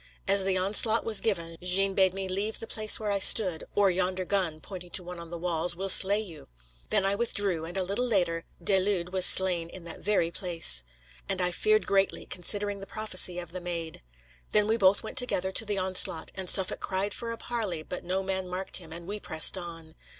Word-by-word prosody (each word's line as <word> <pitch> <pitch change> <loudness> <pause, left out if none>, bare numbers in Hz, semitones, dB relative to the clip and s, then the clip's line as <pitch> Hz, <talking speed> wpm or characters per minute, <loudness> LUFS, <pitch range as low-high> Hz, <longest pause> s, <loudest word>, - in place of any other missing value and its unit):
As 195 0 +5
the 190 -1 0
onslaught 215 +4 +2
was 220 -3 +3
given, 170 -6 -2
Jeanne 195 +2 +3
bade 190 -1 +2
me 195 -1 -4
leave 200 +4 -2
the - - -6
place 215 -1 +4
where 210 -2 -3
I 200 - -1
stood, 185 -4 +6
'or 200 -2 +3
yonder 185 +1 -2
gun' 180 -5 -2
pointing 180 +1 -10
to 185 - -7
one 175 0 -9
on 170 -1 -10
the 170 - -7
walls, 170 0 0
'will 195 +2 -3
slay 200 +2 +6
you.' 170 -9 -9 0.4
Then - - +1
I 195 - +1
withdrew, 200 -6 -2
and 175 +3 -7
a 190 - -1
little 200 +7 -2
later 175 -7 -1 0.2
De 195 +2 +3
Lude 185 -2 -2
was 185 -1 +5
slain 180 -3 +3
in 180 0 -10
that 170 - -10
very 195 -5 -1
place. 165 - +1 0.5
And 195 -1 -2
I 180 -1 -1
feared 430 - +1
greatly, 195 0 -1
considering 205 +2 -1
the 195 - -10
prophecy 185 -4 0
of 175 -2 -7
the 185 +1 -7
Maid. 170 -2 -6 0.5
Then 210 - +4
we 220 +1 0
both 195 -2 +2
went 220 - +2
together 190 -7 -1
to 225 - +2
the 205 -1 -3
onslaught; 185 -3 0
and 190 -1 -4
Suffolk 190 -2 +1
cried 195 +2 -2
for 235 -1 -6
a 230 - -7
parley, 215 -10 -5
but 180 - -8
no 190 +2 -3
man 190 -1 -4
marked 185 +1 -2
him, 165 -3 -9
and 170 +1 -9
we 205 +3 -6
pressed 160 -2 0
on. 165 -3 -9
190 Hz, 220 wpm, -27 LUFS, 175-200 Hz, 0.5 s, stood